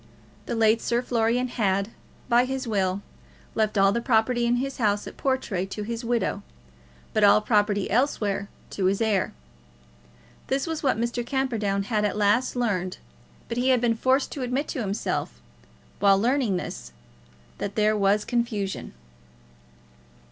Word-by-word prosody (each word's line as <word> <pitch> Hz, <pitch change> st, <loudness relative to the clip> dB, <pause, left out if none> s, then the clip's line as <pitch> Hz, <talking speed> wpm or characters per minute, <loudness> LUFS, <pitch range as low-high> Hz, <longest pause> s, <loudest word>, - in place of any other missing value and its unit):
The -, -, -2 dB
late 225 Hz, 0 st, +3 dB
Sir 240 Hz, +1 st, 0 dB
Florian 240 Hz, +1 st, +1 dB
had, 200 Hz, -4 st, 0 dB, 0.4 s
by 240 Hz, 0 st, +4 dB
his 265 Hz, 0 st, -3 dB
will, 195 Hz, -2 st, 0 dB, 0.5 s
left 215 Hz, -1 st, 0 dB
all 195 Hz, 0 st, +5 dB
the 235 Hz, +3 st, -1 dB
property 235 Hz, 0 st, +2 dB
in 240 Hz, -, +3 dB
his 265 Hz, +2 st, -3 dB
house 205 Hz, -3 st, +1 dB
at -, -, -9 dB
Portray 240 Hz, -9 st, -1 dB
to 210 Hz, +2 st, -5 dB
his 230 Hz, +2 st, -4 dB
widow, 235 Hz, -3 st, -1 dB, 0.7 s
but 215 Hz, -, +2 dB
all 205 Hz, +1 st, +7 dB
property 210 Hz, -2 st, +1 dB
elsewhere 210 Hz, -5 st, 0 dB, 0.2 s
to 190 Hz, -, -2 dB
his 195 Hz, +1 st, +2 dB
heir. 215 Hz, -4 st, +1 dB, 1.2 s
This 270 Hz, +1 st, 0 dB
was 325 Hz, -2 st, -3 dB
what 265 Hz, -6 st, +1 dB
Mr. 235 Hz, +1 st, -1 dB
Camperdown 230 Hz, -7 st, -1 dB
had 210 Hz, 0 st, 0 dB
at 210 Hz, 0 st, 0 dB
last 210 Hz, +6 st, +2 dB
learned, 195 Hz, -7 st, -1 dB, 0.5 s
but 235 Hz, -, -3 dB
he 255 Hz, +2 st, +2 dB
had 255 Hz, -1 st, +4 dB
been 235 Hz, -1 st, +2 dB
forced 260 Hz, +4 st, +1 dB
to 280 Hz, -, -5 dB
admit 255 Hz, +4 st, -1 dB
to 260 Hz, -, -3 dB
himself, 200 Hz, 0 st, -3 dB, 0.6 s
while 200 Hz, -1 st, +5 dB
learning 235 Hz, -2 st, +1 dB
this, 60 Hz, -, -7 dB, 0.7 s
that 200 Hz, 0 st, -4 dB
there 215 Hz, 0 st, +3 dB
was 205 Hz, +1 st, +2 dB
confusion. 220 Hz, -, -2 dB
225 Hz, 155 wpm, -25 LUFS, 200-245 Hz, 1.2 s, all